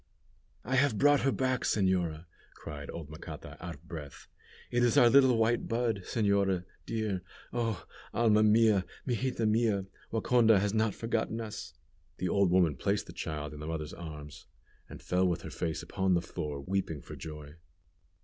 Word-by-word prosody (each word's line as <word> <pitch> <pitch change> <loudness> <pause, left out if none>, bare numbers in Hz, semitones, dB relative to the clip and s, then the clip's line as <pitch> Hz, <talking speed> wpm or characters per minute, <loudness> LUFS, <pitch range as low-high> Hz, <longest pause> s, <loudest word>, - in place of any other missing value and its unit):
"I 130 +3 +1
have 135 -4 +3
brought 145 +2 +5
her 135 - +2
back, 130 -1 0
señora," 90 -5 +1 0.3
cried 75 -2 -8
old 80 -3 -7
Macata, 75 -2 -8
out 85 -2 -5
of - - -21
breath. 75 -4 -8 0.5
"It 120 - +2
is 120 -2 +3
our 120 -1 +7
little 130 -3 +6
white 115 +1 +2
bud, 115 -3 0
señora, 100 -4 +1 0.2
dear! 110 -5 -1 0.3
Oh! 115 -6 -1 0.3
Alma 110 -2 +4
mia! 110 -2 +5 0.2
Mijita 125 -2 0
mia, 110 -3 +2 0.3
Waconda 115 -1 +4
has 100 +1 0
not 110 -2 +1
forgotten 115 0 -1
us!" 110 -7 -6 0.4
The 90 - -1
old 100 +1 +3
woman 85 -6 +3
placed - - 0
the - - -10
child 75 -1 -4
in 75 - -9
the 75 - -6
mother's 80 -2 -4
arms, 75 -3 -9 0.4
and - - -10
fell 90 +1 +2
with 85 -2 -1
her - - -7
face 80 -3 -3
upon 95 -1 +1
the 85 - +2
floor, 75 -5 -5
weeping 90 -2 -2
for - - -9
joy. 75 -2 -8
100 Hz, 170 wpm, -31 LUFS, 80-115 Hz, 0.5 s, our